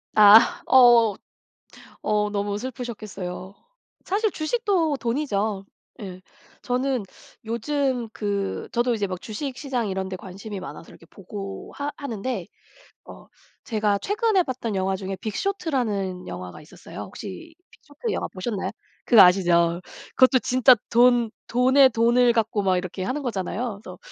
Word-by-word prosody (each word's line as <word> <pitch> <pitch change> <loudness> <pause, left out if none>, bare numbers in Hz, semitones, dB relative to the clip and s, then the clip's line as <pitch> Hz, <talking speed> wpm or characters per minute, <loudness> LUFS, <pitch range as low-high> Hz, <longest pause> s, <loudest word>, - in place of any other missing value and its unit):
아 215 +1 +7
어 240 -5 +6 0.9
어 210 0 0
너무 205 0 -2
슬프셨겠어요. 210 -7 -7 0.5
사실 425 +3 0
주식도 335 -3 0
돈이죠. 220 -5 -1 0.4
예 185 -2 -8 0.4
저는 255 -2 -1 0.4
요즘 250 +1 -1
그 200 -2 -3
저도 240 0 +1
이제 205 -3 -1
막 185 -2 -6
주식시장 255 0 -4
이런 190 0 -3
데 185 - -4
관심이 195 +2 -8
많아서 170 - -9
이렇게 - - -16
보고 195 +1 -8
하 285 0 -3
하는데 235 - -4 0.6
어 - - -13 0.4
제가 210 -3 0
최근에 410 - +1
봤던 250 -6 -4
영화 190 0 0
중에 190 0 -5
빅쇼트라는 220 - -2
영화가 90 +7 -8
있었어요. 150 - -12
혹시 330 -1 -9 0.2
빅쇼트 435 -1 -7
영화 - - -2
보셨나요? 190 0 -4 0.4
그 230 - +7
아시죠. 175 -2 +4 0.4
그것도 260 0 +6
진짜 255 +2 +5 0.2
돈 240 -1 +4 0.2
돈의 260 +2 +5
돈을 240 +1 +3
갖고 215 -2 0
막 190 -2 +2
이렇게 185 +1 -5
하는 270 +8 -3
거잖아요. 215 -1 -3
그래서 - - -10
225 Hz, 290 characters per minute, -24 LUFS, 195-260 Hz, 0.9 s, 아